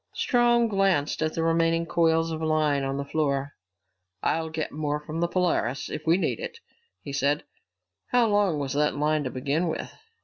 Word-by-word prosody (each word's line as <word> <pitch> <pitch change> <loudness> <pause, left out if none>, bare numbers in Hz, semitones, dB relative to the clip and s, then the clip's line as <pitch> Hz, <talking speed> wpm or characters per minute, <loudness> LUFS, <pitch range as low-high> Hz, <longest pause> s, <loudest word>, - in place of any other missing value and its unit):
Strong 240 -1 +3
glanced 195 -9 +1
at 155 0 -1
the 165 - 0
remaining 165 0 +2
coils 165 -1 +2
of 160 0 -4
line 155 -3 +1
on 135 0 -2
the 140 - -3
floor. 140 -2 -1 0.7
"I'll 160 0 0
get 160 -1 -3
more 150 0 -2
from 155 +2 -6
the 170 - +2
Polaris, 170 -8 0
if 155 - -6
we 165 +2 +5
need - - -1
it," 460 - -6 0.5
he 140 - -6
said. 140 +2 +1 0.6
"How 245 -1 +3
long 205 -6 +2
was 140 -2 -3
that 150 +1 +1
line 150 +1 +1
to - - -1
begin 140 +7 -1
with?" 160 - -4
155 Hz, 180 wpm, -26 LUFS, 145-170 Hz, 0.7 s, we